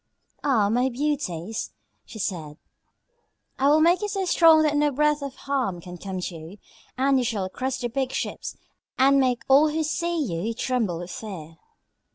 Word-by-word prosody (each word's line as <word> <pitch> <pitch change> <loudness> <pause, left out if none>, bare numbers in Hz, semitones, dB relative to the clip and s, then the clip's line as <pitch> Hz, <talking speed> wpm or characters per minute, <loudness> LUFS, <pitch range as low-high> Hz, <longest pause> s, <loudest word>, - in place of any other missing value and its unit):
"Ah, 235 -8 +3
my 245 +4 +2
beauties," 240 - -3 0.3
she - - -11
said, 160 -7 -4 1.0
"I 270 - +3
will 305 +2 +5
make 345 +4 +4
you 420 - -1
so 390 -2 -2
strong 325 -3 +6
that 300 -1 +1
no 295 0 +3
breath 300 +1 +1
of 280 -1 -6
harm 255 -10 -2
can 175 +1 -10
come 190 0 -5
to 180 - -5
you, 165 +5 -10 0.4
and 270 +1 +3
you - - 0
shall 205 -5 -2
crush 260 +5 -3
the 245 - -2
big 260 +2 -2
ships - - -4 0.4
and 275 +1 +5
make 250 -2 +1
all 285 +3 +6
who 315 +1 -1
see 340 +3 -1
you 220 - -2
tremble 230 -8 -1
with 175 +1 -7
fear." 165 -7 -8
255 Hz, 180 wpm, -25 LUFS, 195-295 Hz, 1.0 s, strong